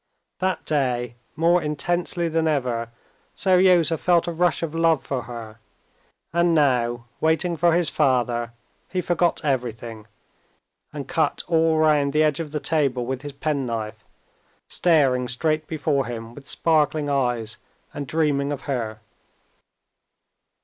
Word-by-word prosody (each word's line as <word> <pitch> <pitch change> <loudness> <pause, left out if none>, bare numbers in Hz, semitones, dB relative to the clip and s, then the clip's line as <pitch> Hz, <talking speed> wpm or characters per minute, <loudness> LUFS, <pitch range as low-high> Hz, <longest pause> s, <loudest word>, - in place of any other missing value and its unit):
That 185 0 -1
day, 125 -5 0 0.2
more 170 +2 +3
intensely 170 +3 -1
than 165 0 0
ever, 125 -6 -1 0.5
Seryozha 180 -4 +4
felt 175 -2 +3
a - - -1
rush 170 0 +1
of 160 -2 -3
love 165 -3 +2
for 135 -3 -2
her, 115 -2 -9 0.7
and 170 0 +3
now, 120 -5 +1
waiting 160 +2 +1
for 170 +1 +3
his 175 -2 +2
father, 120 -5 +1 0.4
he 185 - -2
forgot 175 -1 +1
everything, 115 -5 -3 0.8
and 145 -2 -6
cut 160 -3 0
all 165 -1 +3
round 150 -3 +3
the 155 +1 +4
edge 150 -1 +1
of 155 -3 -5
the 150 - -2
table 140 -6 0
with 130 +1 -3
his 145 0 -7
penknife, 125 -7 -3 0.6
staring 135 -7 +2
straight 155 +5 -1
before 145 -4 0
him 115 -1 -6
with 140 +2 -13
sparkling 155 -2 +1
eyes 120 -6 -1 0.4
and 145 -2 -5
dreaming 145 -2 +1
of 140 -2 -4
her. 115 -6 -4
145 Hz, 135 wpm, -23 LUFS, 125-165 Hz, 0.8 s, Seryozha